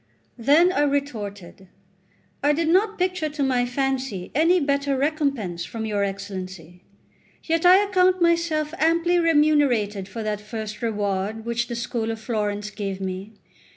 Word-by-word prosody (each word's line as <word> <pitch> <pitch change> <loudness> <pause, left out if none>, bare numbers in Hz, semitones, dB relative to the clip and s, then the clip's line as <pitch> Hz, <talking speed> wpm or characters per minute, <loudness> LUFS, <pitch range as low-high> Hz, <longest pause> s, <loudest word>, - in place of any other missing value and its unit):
Then 300 +9 +5
I 290 - +1
retorted: 210 -10 -3 0.7
"I 290 +1 +3
did 320 +1 0
not 410 +5 +2
picture 360 -4 -1
to 295 -1 -3
my 250 -2 +1
fancy 260 -7 -2
any 330 +5 +4
better 280 -2 0
recompense 275 - -1
from 220 +4 -5
your 205 -2 0
Excellency; 185 -3 -6 0.6
yet 330 +1 +2
I 380 +3 +7
account 370 -1 +3
myself 335 -3 +1
amply 335 +2 +3
remunerated 290 - +2
by 225 +3 -5
that 210 -1 -2
first 215 +1 -6
reward 210 -1 -2
which 235 0 -1
the 235 - -4
school 230 -1 -3
of 225 -1 -4
Florence 210 -2 -3
gave 195 -2 -4
me. 190 +2 -5
245 Hz, 145 wpm, -23 LUFS, 205-310 Hz, 0.7 s, I